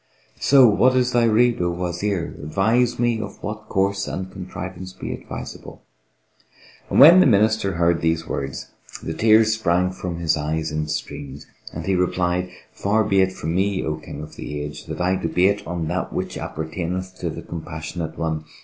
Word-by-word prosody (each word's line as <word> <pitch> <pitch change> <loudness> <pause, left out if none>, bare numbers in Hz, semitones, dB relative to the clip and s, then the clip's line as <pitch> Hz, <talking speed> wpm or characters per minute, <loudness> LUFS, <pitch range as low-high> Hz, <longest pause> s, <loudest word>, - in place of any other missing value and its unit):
So 135 -2 +6
what 125 +5 +4
is 125 -1 +2
thy 120 -1 +3
rede, 115 0 +3
O 90 - +1
Wazir? 90 +1 -2
Advise 110 +10 +1
me 120 -2 +1
of - - -7
what 110 +1 -6
course 100 +1 0
and 95 0 -5
contrivance 95 0 -7
be - - -5
advisable!" - - -9 1.1
When 165 +7 +9
the 185 - +6
Minister 110 -3 +3
heard 85 0 +2
these 80 0 0
words, 70 0 -4 0.3
the 80 - -3
tears 110 +2 +4
sprang 90 -4 +1
from 90 -2 -5
his 85 -2 +1
eyes 80 +1 -2
in 75 0 -2
streams, 70 -2 -5 0.3
and - - -6
he 95 - +1
replied, 90 0 0 0.2
"Far 110 +2 +1
be 100 -2 +3
it 95 0 +2
from 80 -3 -4
me, 95 +1 0
O 75 -1 -2
King 75 -1 -8
of 75 - -11
the 75 0 -5
Age, 75 0 -7
that 80 0 -6
I 90 +1 +2
debate 95 +4 +1
on 85 -2 -3
that 90 +2 -2
which - - -3
appertaineth 90 +4 -4
to - - -2
the - - -7
Compassionate 80 0 -6
One! 80 -2 -2
90 Hz, 175 wpm, -22 LUFS, 80-105 Hz, 1.1 s, When